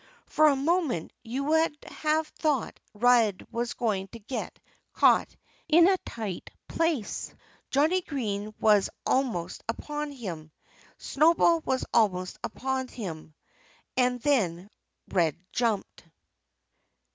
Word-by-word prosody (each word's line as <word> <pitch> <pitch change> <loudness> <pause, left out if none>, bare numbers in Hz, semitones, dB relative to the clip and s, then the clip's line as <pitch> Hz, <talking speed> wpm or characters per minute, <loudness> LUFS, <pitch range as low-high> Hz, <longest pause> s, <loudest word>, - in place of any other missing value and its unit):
For 310 0 +4
a 290 - +4
moment 285 - 0
you 250 +4 -4
would 320 +1 +2
have 310 +1 0
thought 295 -7 -1 0.2
Red 230 -3 +3
was 235 +1 -2
going 205 -5 -1
to 230 - -11
get 230 +4 -5 0.4
caught - - +4 0.3
in 335 +2 +7
a 385 - +5
tight 215 -6 -6 0.2
place. 325 -10 -2 0.3
Johnnie 310 +7 +3
Green 215 - -3
was 210 -2 +4 0.2
almost 220 -10 -1
upon 295 +5 -3
him. 175 - -7 0.5
Snowball 330 +3 +3
was 260 -4 -1
almost 185 -5 +1
upon 260 +3 -2
him. 160 -10 -7 0.6
And 250 -1 +2
then 200 - 0 0.4
Red 165 -6 +2 0.2
jumped. 230 -5 -1
245 Hz, 110 wpm, -28 LUFS, 205-295 Hz, 0.6 s, in